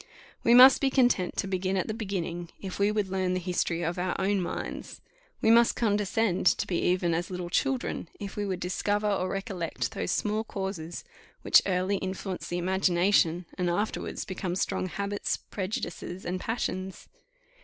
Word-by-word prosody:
We 235 Hz, -, +6 dB
must 260 Hz, +2 st, +9 dB
be 275 Hz, -, +3 dB
content 245 Hz, -9 st, +2 dB
to 195 Hz, -, -1 dB
begin 190 Hz, 0 st, -1 dB
at 185 Hz, -, -1 dB
the 215 Hz, -, -2 dB
beginning, 180 Hz, -6 st, -4 dB
if 190 Hz, -1 st, -6 dB
we 200 Hz, +1 st, +3 dB
would 210 Hz, -2 st, 0 dB
learn 185 Hz, -1 st, 0 dB
the -, -, 0 dB
history 175 Hz, -1 st, -1 dB
of 170 Hz, +2 st, -2 dB
our 180 Hz, 0 st, -1 dB
own 195 Hz, 0 st, +1 dB
minds; 175 Hz, -, -5 dB, 0.4 s
we 220 Hz, -, +5 dB
must 235 Hz, 0 st, +5 dB
condescend 205 Hz, -3 st, +1 dB
to -, -, +3 dB
be 175 Hz, -, -1 dB
even 180 Hz, -1 st, +1 dB
as 170 Hz, +2 st, -2 dB
little 180 Hz, -2 st, -5 dB
children, 260 Hz, -, -1 dB
if 200 Hz, -1 st, -6 dB
we 205 Hz, -, -2 dB
would 190 Hz, -3 st, -2 dB
discover 205 Hz, +4 st, 0 dB
or 195 Hz, -2 st, 0 dB
recollect 195 Hz, -4 st, -3 dB
those 215 Hz, -, -3 dB
small 215 Hz, +1 st, 0 dB
causes 190 Hz, -6 st, -5 dB, 0.4 s
which -, -, +7 dB
early 185 Hz, +1 st, +1 dB
influence 190 Hz, 0 st, -4 dB
the 175 Hz, -, -2 dB
imagination, 180 Hz, -1 st, +2 dB
and 180 Hz, -1 st, +1 dB
afterwards 205 Hz, +5 st, -2 dB
become 185 Hz, -2 st, -3 dB
strong 185 Hz, -, -1 dB
habits, 200 Hz, +2 st, -2 dB
prejudices, 185 Hz, -2 st, -5 dB
and 180 Hz, +1 st, -2 dB
passions. 190 Hz, -4 st, -3 dB
190 Hz, 170 wpm, -28 LUFS, 180-205 Hz, 0.4 s, must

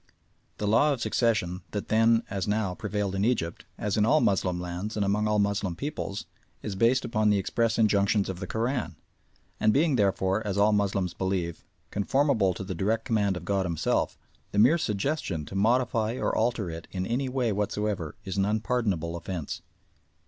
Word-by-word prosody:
The 105 Hz, -, -2 dB
law 145 Hz, +8 st, +4 dB
of 135 Hz, -, -4 dB
succession 105 Hz, -8 st, 0 dB
that 105 Hz, -, -4 dB
then, 115 Hz, +1 st, +4 dB
as 95 Hz, -2 st, -3 dB
now, 105 Hz, -3 st, 0 dB
prevailed 105 Hz, 0 st, -2 dB
in 95 Hz, +1 st, 0 dB
Egypt, 105 Hz, -8 st, -1 dB
as 105 Hz, 0 st, -1 dB
in 105 Hz, -, +4 dB
all 150 Hz, +8 st, +4 dB
Moslem 90 Hz, -5 st, +1 dB
lands 90 Hz, +4 st, -4 dB
and 105 Hz, -2 st, 0 dB
amongst 105 Hz, +2 st, +1 dB
all 105 Hz, -, +2 dB
Moslem 100 Hz, -3 st, 0 dB
peoples, 140 Hz, -, -4 dB, 0.4 s
is 105 Hz, -, -3 dB
based 120 Hz, +6 st, +3 dB
upon 110 Hz, -2 st, +1 dB
the 105 Hz, -, +4 dB
express 115 Hz, +4 st, 0 dB
injunctions 100 Hz, -2 st, +3 dB
of 95 Hz, -2 st, -5 dB
the 95 Hz, -, -5 dB
Koran, 115 Hz, -, -2 dB, 0.6 s
and 110 Hz, -, +4 dB
being 145 Hz, +2 st, +3 dB
therefore, 100 Hz, 0 st, +1 dB
as 100 Hz, -2 st, -2 dB
all 105 Hz, +1 st, +4 dB
Moslems 95 Hz, -3 st, 0 dB
believe, 90 Hz, -3 st, -2 dB, 0.3 s
conformable 105 Hz, -, +2 dB
to -, -, -5 dB
the 95 Hz, 0 st, -4 dB
direct 110 Hz, +6 st, 0 dB
command 100 Hz, -4 st, +1 dB
of 85 Hz, -, -8 dB
God 100 Hz, 0 st, +1 dB
Himself, 85 Hz, -2 st, 0 dB, 0.3 s
the -, -, -4 dB
mere 130 Hz, +11 st, +5 dB
suggestion 100 Hz, -, -2 dB
to -, -, -10 dB
modify 115 Hz, +2 st, +1 dB
or -, -, -1 dB
alter 115 Hz, -3 st, 0 dB
it 80 Hz, +1 st, -8 dB
in 95 Hz, -1 st, -3 dB
any 130 Hz, +5 st, -1 dB
way 125 Hz, -3 st, 0 dB
whatever 105 Hz, -5 st, -2 dB
is 95 Hz, 0 st, -4 dB
an 95 Hz, -, +3 dB
unpardonable 105 Hz, -6 st, 0 dB
offence. 85 Hz, -2 st, -5 dB
105 Hz, 180 wpm, -27 LUFS, 95-115 Hz, 0.6 s, mere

